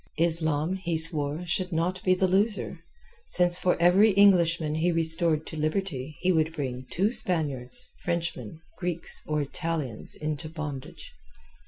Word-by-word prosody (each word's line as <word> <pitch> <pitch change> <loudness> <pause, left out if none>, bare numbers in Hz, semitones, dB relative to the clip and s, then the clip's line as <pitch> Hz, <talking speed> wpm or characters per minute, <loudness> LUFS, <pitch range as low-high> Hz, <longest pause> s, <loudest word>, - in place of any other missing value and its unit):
Islam, 160 +1 +2
he 170 -3 -2
swore, 160 0 0
should 180 +2 -1
not 175 +3 -1
be 185 -1 +3
the 185 +1 +1
loser, 200 +3 0 0.5
since 175 -1 +3
for 180 -1 0
every 190 +5 +5
Englishman 170 -6 +4
he 165 +3 +1
restored 160 -1 +1
to - - -8
liberty 155 -3 -3
he 185 - +2
would 160 -2 +1
bring 130 -4 -5
two 200 +5 +1
Spaniards, 145 - 0
Frenchmen, 170 -5 -4 0.2
Greeks, 175 -2 -3
or 150 -1 0
Italians 145 -5 -3
into 155 0 -4
bondage. 150 -4 -7
165 Hz, 140 wpm, -27 LUFS, 155-180 Hz, 0.5 s, every